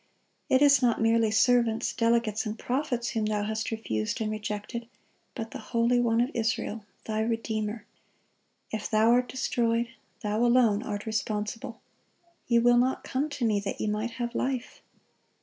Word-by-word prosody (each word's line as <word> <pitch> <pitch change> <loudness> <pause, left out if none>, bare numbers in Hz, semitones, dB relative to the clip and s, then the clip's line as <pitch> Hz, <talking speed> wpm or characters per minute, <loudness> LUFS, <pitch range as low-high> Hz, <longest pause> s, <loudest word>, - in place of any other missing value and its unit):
It 260 +2 +5
is 280 -2 +6
not 240 -2 +2
merely 225 0 +3
servants, 230 0 +2
delegates, 230 -2 +1
and 215 +1 -4
prophets, 250 -2 -1
whom 220 -2 -1
thou 210 -1 0
hast 220 +1 -2
refused 110 - -2
and 215 -1 -1
rejected, 215 +2 -4 0.5
but 225 -3 -5
the - - -6
Holy 235 +1 +1
One 230 -1 +2
of 250 +4 0
Israel, 225 -2 -2 0.2
thy 215 -1 -2
Redeemer. 220 -1 -2 0.9
If 215 -1 -3
thou 220 +1 +4
art 245 +1 +3
destroyed, 235 -2 0 0.3
thou 210 +2 0
alone 235 -4 +4
art 205 -2 -4
responsible. 220 +1 -3 0.7
'Ye 235 - +4
will 240 +1 +5
not 255 +2 +1
come 280 +4 -1
to 285 -4 -2
Me, 210 -2 +2
that 200 -1 -4
ye - - -1
might 215 +2 -2
have 240 -1 -3
life. 255 -2 -3
230 Hz, 160 wpm, -28 LUFS, 215-240 Hz, 0.9 s, is